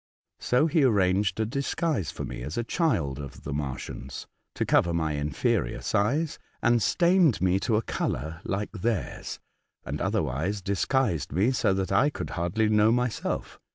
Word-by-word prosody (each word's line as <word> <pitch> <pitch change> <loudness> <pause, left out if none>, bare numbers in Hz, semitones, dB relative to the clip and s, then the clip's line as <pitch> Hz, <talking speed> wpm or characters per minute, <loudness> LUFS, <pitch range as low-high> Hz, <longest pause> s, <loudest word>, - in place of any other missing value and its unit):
So 125 +5 +2
he 160 -1 +3
arranged 100 -4 +2
a 110 - +2
disguise 140 - -1
for - - -5
me - - -6
as 75 +5 -5
a 120 - 0
child 105 - 0
of 70 -2 -9
the 70 - -4
Martians, 65 -2 -5 0.3
to - - 0
cover 85 -1 +3
my 80 -2 0
inferior 70 -4 0
size, 140 +10 0 0.2
and 120 0 +3
stained 170 - +3
me 95 +2 +2
to 110 - 0
a 110 - +1
colour 80 +1 -3
like 100 +2 -2
theirs, 110 +1 -3 0.5
and - - -4
other - - +1
wise 85 +11 -2
disguised 100 - 0
me 95 - +2
so 105 -6 +2
that 95 -1 -2
I 145 - +4
could - - -6
hardly 90 +6 0
know 105 +1 +4
myself. 125 0 -2
100 Hz, 165 wpm, -27 LUFS, 80-125 Hz, 0.5 s, I